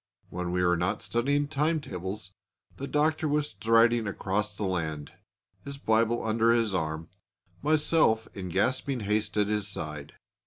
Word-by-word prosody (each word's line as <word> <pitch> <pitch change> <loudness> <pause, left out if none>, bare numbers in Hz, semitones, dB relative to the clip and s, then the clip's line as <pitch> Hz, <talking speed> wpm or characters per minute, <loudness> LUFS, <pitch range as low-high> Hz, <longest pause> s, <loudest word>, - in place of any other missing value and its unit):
When 90 0 -3
we 90 0 +1
were 90 -1 +3
not 90 +1 -1
studying 140 +5 +1
time 155 +2 +1
tables 95 -5 -6 0.4
the 140 - -5
Doctor 155 +2 +1
was 150 0 0
striding 115 0 +3
across 105 +1 -2
the - - -3
land, 80 -6 -3 0.5
his 140 0 -7
Bible 115 -2 +1
under 115 +1 +3
his 115 -3 +2
arm, 80 -2 -2 0.5
myself 150 -7 +3
in 95 -2 -6
gasping 130 +7 0
haste 105 0 -1
at 105 - +4
his 105 -1 -1
side. 75 -6 -6
110 Hz, 150 wpm, -28 LUFS, 90-135 Hz, 0.5 s, at